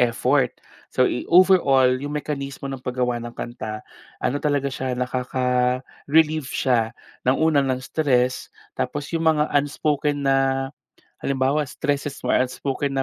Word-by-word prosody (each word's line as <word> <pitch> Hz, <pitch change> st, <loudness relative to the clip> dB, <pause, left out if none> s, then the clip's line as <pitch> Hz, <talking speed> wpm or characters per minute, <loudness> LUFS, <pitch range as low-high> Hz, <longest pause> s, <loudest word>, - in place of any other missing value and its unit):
effort. 125 Hz, +2 st, +2 dB, 0.4 s
So, -, -, +3 dB
eh, -, -, -1 dB
overall, 140 Hz, -9 st, +5 dB
'yong 145 Hz, +1 st, -4 dB
mekanismo 140 Hz, -2 st, -5 dB
ng 135 Hz, -2 st, -6 dB
paggawa 125 Hz, -1 st, -1 dB
ng 120 Hz, 0 st, -7 dB
kanta, 110 Hz, -2 st, -6 dB, 0.3 s
ano 140 Hz, -, -1 dB
talaga 145 Hz, -2 st, +1 dB
siya 130 Hz, -1 st, -3 dB
nakaka-relieve 130 Hz, +4 st, 0 dB
siya 115 Hz, -4 st, +1 dB, 0.4 s
ng 130 Hz, -, +4 dB
una, 160 Hz, -3 st, +3 dB
ng 130 Hz, -1 st, 0 dB
stress, 130 Hz, -2 st, 0 dB, 0.3 s
tapos 140 Hz, +3 st, -3 dB
'yong 165 Hz, -, 0 dB, 0.2 s
mga 150 Hz, -, +3 dB
unspoken 145 Hz, 0 st, 0 dB
na 135 Hz, 0 st, +4 dB, 0.8 s
halimbawa 140 Hz, +2 st, 0 dB
stresses 145 Hz, 0 st, -2 dB
mo, 125 Hz, -, -1 dB
unspoken 135 Hz, +2 st, 0 dB
na 135 Hz, -, +1 dB
135 Hz, 135 wpm, -23 LUFS, 125-145 Hz, 0.8 s, overall